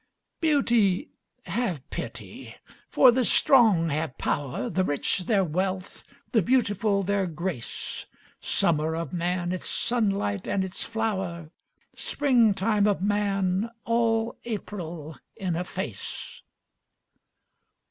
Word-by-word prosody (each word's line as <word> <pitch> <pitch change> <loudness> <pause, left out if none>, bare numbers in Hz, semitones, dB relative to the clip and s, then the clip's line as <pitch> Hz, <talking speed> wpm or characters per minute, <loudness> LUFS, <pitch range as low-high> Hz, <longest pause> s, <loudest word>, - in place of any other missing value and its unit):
Beauty, 240 - +2 0.4
have 185 - -2
pity! - - -7 0.3
for 255 - +7
the 255 +1 +2
strong 220 -10 +5
have 150 -2 -2
power, 140 - -2
The 190 -5 0
rich 175 +3 0
their 200 -4 +3
wealth, 185 +3 -2 0.3
the 225 - +4
beautiful 205 -3 +2
their 200 0 +1
grace, 170 -6 -5 0.3
Summer 160 0 +1
of 165 +2 -4
man 175 0 -1
its 185 - -3
sunlight 195 - 0
and 190 - +1
its 190 0 -3
flower. 190 -8 -3 0.4
Spring 245 -8 +2
time 210 +1 +2
of 200 -3 +1
man, 200 0 +1 0.2
all 230 0 +1
April 175 -8 -6 0.2
in 190 -6 -2
a 175 - -1
face. 180 - -6
195 Hz, 110 wpm, -26 LUFS, 170-225 Hz, 0.4 s, for